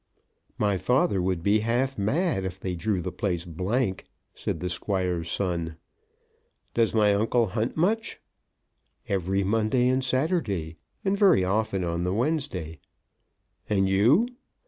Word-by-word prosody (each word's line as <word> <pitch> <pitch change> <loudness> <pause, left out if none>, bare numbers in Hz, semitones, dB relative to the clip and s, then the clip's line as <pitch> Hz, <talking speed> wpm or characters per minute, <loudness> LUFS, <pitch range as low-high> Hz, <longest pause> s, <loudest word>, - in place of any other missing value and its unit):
"My 100 -2 +1
father 105 -2 +2
would 90 -2 -1
be 105 +3 +3
half 120 +5 0
mad 125 - 0
if 95 0 -5
they 95 -1 -3
drew 95 +2 -1
the 90 - -4
place 90 -3 -2
blank," 95 +5 -1 0.3
said - - -3
the 90 - -3
Squire's 90 -1 -2
son. 85 -4 -2 1.0
"Does 115 -1 +2
my 105 -2 +4
uncle 115 +3 +2
hunt 110 +7 -2
much?" 215 +7 0 0.9
"Every 95 0 0
Monday 110 +5 +2
and 130 +1 +1
Saturday, 130 - -1 0.3
and 195 +1 +2
very 195 - +5
often 100 0 0
on 85 0 -1
the 90 +2 -1
Wednesday." 115 - -2 0.9
"And 95 -2 +2
you?" 115 - +4
100 Hz, 135 wpm, -26 LUFS, 90-125 Hz, 1.0 s, very